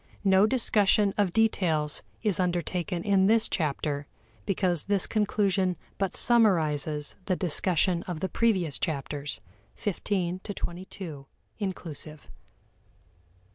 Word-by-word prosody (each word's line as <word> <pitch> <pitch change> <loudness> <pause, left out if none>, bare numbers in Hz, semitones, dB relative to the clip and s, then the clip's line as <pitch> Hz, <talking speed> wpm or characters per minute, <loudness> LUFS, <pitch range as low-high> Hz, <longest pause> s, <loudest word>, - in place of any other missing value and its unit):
No 195 +1 +5
discussion 210 -4 +3
of 200 -4 +1
details 170 -9 +2 0.2
is 205 -5 +1
undertaken 175 0 -1
in 195 -2 +3
this 225 +1 +4
chapter, 145 -3 -2 0.4
because 180 -4 0
this 200 -2 +1
conclusion 200 -4 +1 0.2
but 195 -2 -1
summarizes 155 - +3
the 185 - +2
discussion 175 +1 +1
of 175 -4 -4
the 190 - -1
previous 185 - +1
chapters, 145 -4 -3 0.4
XV 205 -4 -3 0.4
to - - -13
XXII, 175 -5 -6 0.3
inclusive. 160 - -5
180 Hz, 105 wpm, -27 LUFS, 155-200 Hz, 0.4 s, No